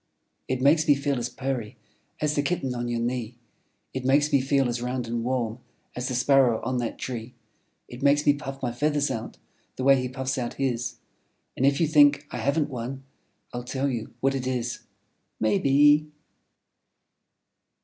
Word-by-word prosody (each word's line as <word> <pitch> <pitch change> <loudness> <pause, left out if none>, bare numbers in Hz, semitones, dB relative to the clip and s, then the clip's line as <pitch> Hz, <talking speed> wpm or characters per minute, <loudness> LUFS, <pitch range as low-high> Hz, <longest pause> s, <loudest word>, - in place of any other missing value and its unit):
It 130 0 -1
makes 155 +3 +4
me 145 - +6
feel 140 -1 -1
as 120 0 -3
purry 125 -4 -4 0.4
As 150 -1 +1
the 145 - +1
Kitten 140 -4 -1
on 120 0 -3
your 120 -1 -1
knee. 120 0 -2 0.6
It 130 - -4
makes 145 +3 +3
me 140 - +5
feel 135 0 +2
as 120 0 -2
round 125 0 -2
and 115 0 -3
warm 120 -2 -1 0.4
As 125 +1 -3
the 130 - -2
Sparrow 130 -3 +4
on 130 +2 -1
that 120 -2 -3
tree; 120 -1 -6 0.5
It 120 +2 -10
makes 145 +1 +3
me 145 - +6
puff 135 -2 -7
my 120 - 0
feathers 145 +3 0
out 115 0 -5 0.4
The 130 - -4
way 135 -1 +5
he 125 - -3
puffs 130 +1 -3
out 120 -1 -4
his. 125 -3 -2 0.6
And 135 - +2
if 140 0 +2
you 165 - +4
think 145 -2 +5
I - - -4
haven't 145 +2 0
one, 130 +2 -5 0.5
I'll 120 0 -4
tell 130 +3 -2
you 115 -2 -5
what 135 +1 +2
it 130 -1 -3
Is, 125 -2 -2 0.6
Maybe! 145 +7 +4
130 Hz, 180 wpm, -26 LUFS, 120-140 Hz, 0.6 s, me